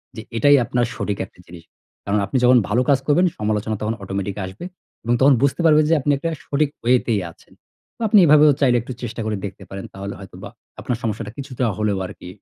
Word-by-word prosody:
যে, 110 - -6 0.2
এটাই 145 +4 +5
আপনার 120 0 0
সঠিক 100 -1 -3
একটি 90 - -25
জিনিস। 85 -1 -12 0.4
কারণ 100 +1 +1
আপনি 130 - -2
যখন 125 0 +6
ভালো 120 +4 +2
কাজ 135 -2 +4
করবেন, 170 +5 +4
সমালোচনা 105 0 -1
তখন 110 +1 -1
অটোমেটিক 95 0 -4
আসবে 95 - -9 0.4
এবং 120 - 0
তখন 140 +1 +6
বুঝতে 140 +5 +1
পারবেন 155 -1 +5
যে 165 - +4
আপনি 145 +2 +1
একটা 165 +4 -3 0.2
সঠিক 145 0 0
ওয়েতেই 120 -4 +2
আছেন। - - -23 0.4
বা - - -5
আপনি 210 - +6
এভাবেও 150 -1 +6
চাইলে 125 -3 +4
একটু 125 +3 -7
চেষ্টা 115 0 -5
করে 110 -2 -2
দেখতে 95 -1 -8
পারেন। 95 0 -7
তাহলে 100 +1 -6
হয়তোবা 95 - -10 0.3
আপনার 120 - -3
সমস্যাটা 110 -1 -3
কিছুটা 135 -2 -5
হলেও 105 -2 0
আরকি 90 - -10
115 Hz, 205 wpm, -21 LUFS, 100-140 Hz, 0.4 s, যখন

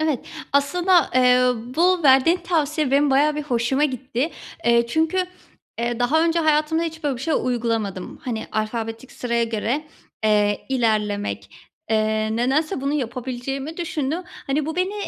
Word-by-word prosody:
Evet. 310 -5 0 0.3
Aslında, 345 +4 +3
eee, 250 0 +5 0.4
bu 360 +1 +3
verdiğin 270 +4 +5
tavsiye 310 -5 0
benim 280 +1 +3
bayağı 295 +3 +3
bir 300 - -2
hoşuma 265 +1 +1
gitti. 260 +1 -2 0.3
Eee, 235 0 +4
çünkü, 320 +8 0 0.6
eee, 235 0 -1
daha 290 +7 +3
önce 335 0 +2
hayatımda 310 +1 +2
hiç 320 -1 -5
böyle 280 -3 0
bir - - -9
şey 315 +3 0
uygulamadım. 225 -6 -2
Hani, 230 -3 -3
alfabetik 225 +2 -3
sıraya 235 -1 -1
göre, 230 +6 -2 0.4
eee, 210 -1 +2
ilerlemek, 215 -5 -1 0.4
eee, 215 0 +1
nedense 270 +5 0
bunu 275 +1 -1
yapabileceğimi 265 +2 -4
düşündüm. 330 -1 -2
Hani, 285 -2 -3
bu 320 +1 -4
beni, 370 +3 0
265 Hz, 145 wpm, -22 LUFS, 235-310 Hz, 0.6 s, eee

